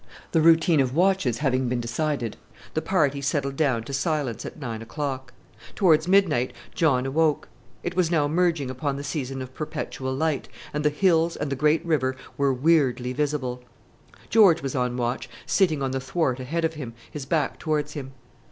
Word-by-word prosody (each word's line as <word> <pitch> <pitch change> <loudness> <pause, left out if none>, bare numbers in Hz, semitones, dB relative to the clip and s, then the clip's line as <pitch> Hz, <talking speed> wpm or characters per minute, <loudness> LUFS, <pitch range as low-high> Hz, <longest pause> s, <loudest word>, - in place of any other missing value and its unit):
The 160 - +3
routine 165 0 +5
of 130 -1 +1
watches 180 - +2
having 130 -1 +1
been 125 0 0
decided, 120 0 -2 0.4
the 155 - 0
party 150 -5 +1
settled 140 0 -1
down 135 -7 +1
to 135 - -8
silence 135 - -1
at - - -10
nine 115 -5 -5
o'clock. 130 +1 -4 0.4
Towards 165 -4 +4
midnight 180 -10 +3 0.2
John 135 -6 +2
awoke. 150 +2 +1 0.4
It 175 - -3
was 180 -3 +2
now 155 -4 +2
merging 160 -4 +1
upon 135 +2 -2
the 140 - -5
season 135 -3 -3
of 130 0 -11
perpetual 130 -4 -4
light, 155 -1 -1 0.2
and 150 +1 -1
the 150 - +4
hills 165 +1 +2
and 145 -1 -3
the - - 0
great 150 +4 +2
river 130 -6 +1 0.2
were 140 -1 +2
weirdly 130 -3 +2
visible. 130 -3 -2 0.7
George 195 -9 +6
was 135 - -2
on 125 -2 -1
watch, 120 +1 -2 0.2
sitting 160 -8 +2
on 135 - -1
the 135 - -1
thwart 135 -1 -1
ahead 160 +6 -1
of 160 - -1
him, 130 -7 -7 0.2
his 140 -3 -6
back 155 -1 0
towards 150 -2 -1
him. 135 -3 -7
145 Hz, 180 wpm, -25 LUFS, 130-160 Hz, 0.7 s, George